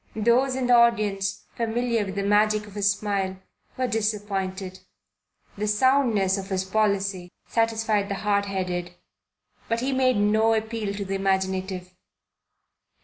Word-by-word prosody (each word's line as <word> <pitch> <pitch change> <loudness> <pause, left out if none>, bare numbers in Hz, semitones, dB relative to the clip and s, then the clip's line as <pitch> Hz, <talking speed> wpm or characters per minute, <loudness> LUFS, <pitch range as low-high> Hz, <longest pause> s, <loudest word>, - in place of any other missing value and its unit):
Those 240 +4 +2
in 260 -1 -1
the 245 - +4
audience 210 -4 +2
familiar 235 0 0
with 195 -1 -6
the 200 - -1
magic 210 +1 +2
of 205 - -13
his 200 -1 +2
smile 200 -2 -1 0.4
were 255 - 0
disappointed. 200 -4 -2 0.8
The 210 - -1
soundness 210 -4 +2
of 195 0 -8
his 190 -1 -1
policy 195 -3 0
satisfied 225 -3 0
the 200 - -1
hard 200 0 0
headed, 180 -2 -3 0.7
but 230 0 0
he 265 +2 -1
made 255 -3 +2
no 215 +2 +3
appeal 220 -2 -3
to 200 0 -4
the 195 - -4
imaginative. 190 -1 -1
205 Hz, 140 wpm, -25 LUFS, 195-225 Hz, 0.8 s, the